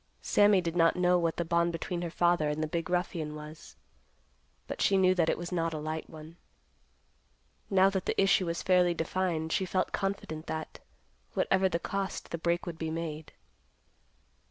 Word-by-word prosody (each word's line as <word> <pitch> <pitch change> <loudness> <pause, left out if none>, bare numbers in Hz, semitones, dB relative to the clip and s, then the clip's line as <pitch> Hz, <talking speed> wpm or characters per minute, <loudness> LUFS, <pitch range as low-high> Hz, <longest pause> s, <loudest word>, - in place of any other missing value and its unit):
Sammy 205 -2 +4
did 170 -1 -3
not 165 -1 +4
know 180 0 +3
what 165 -1 -1
the 170 - -1
bond 170 +1 +2
between 170 +1 -4
her 175 - -3
father 170 -2 +2
and 150 +1 -2
the - - -1
big 165 +2 -3
ruffian 170 -4 -2
was, 150 - -10 0.9
but - - -6
she 195 - +4
knew 185 -1 +5
that 170 -3 +2
it - - +1
was 175 +1 -6
not 165 -2 -1
a - - -3
light 155 +1 -4
one. 160 +2 -11 1.3
Now 190 -1 +5
that 190 -1 -3
the - - 0
issue 195 -2 +3
was 170 0 -3
fairly 180 -2 +3
defined, 165 -1 -1
she - - +1
felt 185 0 -1
confident 195 -5 -3
that, 160 0 -5 0.6
whatever 190 0 +2
the 170 - 0
cost, 195 +2 -4
the 170 - -3
break 170 +1 0
would 170 -2 -6
be 160 - -2
made. 160 -1 -5
170 Hz, 180 wpm, -30 LUFS, 160-185 Hz, 1.3 s, knew